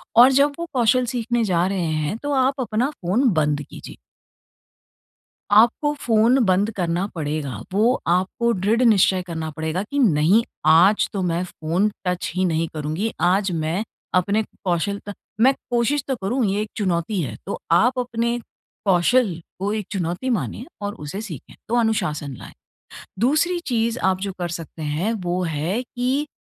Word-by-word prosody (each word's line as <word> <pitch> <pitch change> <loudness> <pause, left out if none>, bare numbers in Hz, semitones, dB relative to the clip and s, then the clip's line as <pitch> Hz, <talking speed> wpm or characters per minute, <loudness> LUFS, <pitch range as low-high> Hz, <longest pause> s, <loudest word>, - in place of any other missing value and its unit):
और 245 +3 +8
जब 280 +2 +3
वो 340 - -2
कौशल 250 0 +3
सीखने 240 -1 -1
जा 180 -4 +2
रहे 190 -3 -1 0.2
हैं, 175 +9 -2
तो 290 +5 -4
आप 265 0 +2
अपना 240 +2 0
फ़ोन 235 - +1
बंद 150 -2 +1
कीजिए। - - -11 1.5
आपको 235 +8 +4
फ़ोन 230 +2 +3
बंद 195 +3 +2
करना 175 0 0
पड़ेगा, 145 -7 -3
वो 225 +6 +2
आपको 185 +7 +1
दृढ़ 210 +5 +1
निश्चय 195 -5 +4
करना 165 -3 -5
पड़ेगा 160 +4 -3
कि 285 - 0
नहीं, 190 - +4 0.2
आज 170 +7 +5
तो 195 - -2
मैं 175 0 0
फ़ोन 180 +3 -1 0.2
टच 180 -1 -1
ही 185 0 +1
नहीं 165 -1 0
करूँगी। 155 +8 -2
आज 190 +2 +2
मैं 165 +4 -1 0.3
अपने 200 +4 +2 0.2
कौशलता 200 +3 -2 0.3
मैं 265 +3 +6 0.2
कोशिश 245 +4 +1
तो 265 - 0
करूँ 235 +6 0
ये 200 +1 0
एक 215 - -4
चुनौती 185 -1 0
है। 120 -8 -4
तो 200 - -4
आप 245 +9 +4
अपने 235 -1 -1 0.5
कौशल 195 +4 +3 0.3
को 200 +2 -1
एक 215 -2 -3
चुनौती 185 +5 -2
माने 240 0 -2 0.2
और 205 0 -3
उसे 150 +7 -5
सीखें 175 - -9
तो 235 - 0
अनुशासन 155 - -1
लाएँ। - - -11 0.7
दूसरी 310 - +2
चीज़ 235 -1 0
आप 190 0 +2
जो 195 0 -3
कर 175 -1 -2
सकते 165 -1 -7
हैं, 155 +9 -1
वो 180 -4 -2
है 165 +8 -1
कि 255 +4 -1
200 Hz, 160 wpm, -22 LUFS, 170-235 Hz, 1.5 s, और